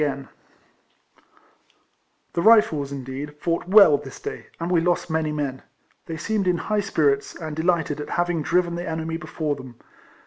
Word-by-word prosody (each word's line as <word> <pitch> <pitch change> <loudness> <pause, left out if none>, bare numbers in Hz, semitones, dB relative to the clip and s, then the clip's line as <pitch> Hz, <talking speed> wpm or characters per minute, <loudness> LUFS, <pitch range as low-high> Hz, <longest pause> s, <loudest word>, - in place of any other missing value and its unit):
42 150 - +3
RECOLLECTIONS 135 -1 -8 0.8
OF - - -30 1.1
The 170 - 0
Rifles, 170 -10 +4
incleed, 140 +2 -6
fought 170 +1 -1
well 195 -7 +7
this - - -10
day, - - -7
and 170 +2 -3
we 170 -2 +3
lost 175 -1 0
many 160 -1 0
men. 140 -3 -3 0.5
They 165 - -5
seemed 205 +3 -1
in 180 -1 +3
high 210 +4 -1
spirits, 145 -8 +1
and 155 -2 -6
delighted 160 -3 0
at - - -7
having 175 -2 0
driven 175 +3 +1
the 170 0 -4
enemy 160 0 -3
before 155 -2 -3
them. 130 -3 -11
160 Hz, 170 wpm, -23 LUFS, 145-175 Hz, 1.1 s, well